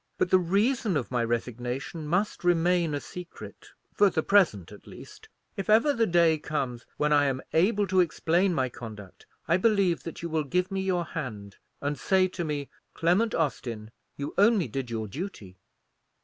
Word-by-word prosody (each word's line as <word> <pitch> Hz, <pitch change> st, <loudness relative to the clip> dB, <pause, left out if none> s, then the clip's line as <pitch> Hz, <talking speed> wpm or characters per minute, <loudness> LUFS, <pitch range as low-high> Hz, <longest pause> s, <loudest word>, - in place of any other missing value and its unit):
But 180 Hz, -, 0 dB
the 185 Hz, -, +6 dB
reason 200 Hz, -, +1 dB
of 130 Hz, -, -4 dB
my 120 Hz, -2 st, +1 dB
resignation 125 Hz, +6 st, -3 dB
must 185 Hz, +6 st, -1 dB
remain 175 Hz, -2 st, +2 dB
a -, -, -2 dB
secret; 180 Hz, +3 st, -10 dB, 0.3 s
for 205 Hz, -, +4 dB
the 160 Hz, -3 st, -1 dB
present 165 Hz, -, +3 dB
at 105 Hz, -, -14 dB
least. -, -, -13 dB, 0.3 s
If 195 Hz, +1 st, -5 dB
ever 230 Hz, +7 st, +5 dB
the 230 Hz, -4 st, +1 dB
day 170 Hz, -2 st, +3 dB
comes 130 Hz, -6 st, -4 dB
when 150 Hz, 0 st, +2 dB
I 145 Hz, -1 st, +4 dB
am 135 Hz, -2 st, 0 dB
able 200 Hz, +5 st, +3 dB
to 190 Hz, -1 st, +1 dB
explain 175 Hz, +2 st, +2 dB
my 130 Hz, -6 st, 0 dB
conduct, 110 Hz, -6 st, -11 dB, 0.2 s
I 170 Hz, -, +3 dB
believe 195 Hz, -4 st, +2 dB
that 165 Hz, 0 st, -8 dB
you -, -, -2 dB
will 160 Hz, -1 st, 0 dB
give 180 Hz, +6 st, -1 dB
me 195 Hz, 0 st, -1 dB
your 180 Hz, -2 st, 0 dB
hand, 105 Hz, -12 st, -7 dB, 0.2 s
and 145 Hz, 0 st, -2 dB
say 190 Hz, -1 st, +3 dB
to 180 Hz, -1 st, -4 dB
me, 145 Hz, -3 st, -3 dB, 0.3 s
'Clement 185 Hz, +7 st, +2 dB
Austin, 120 Hz, -8 st, -3 dB, 0.3 s
you 140 Hz, 0 st, -5 dB
only 205 Hz, -3 st, +4 dB
did 135 Hz, -3 st, -4 dB
your 110 Hz, -2 st, -3 dB
duty.'" 105 Hz, -, -7 dB
165 Hz, 175 wpm, -27 LUFS, 130-185 Hz, 0.3 s, the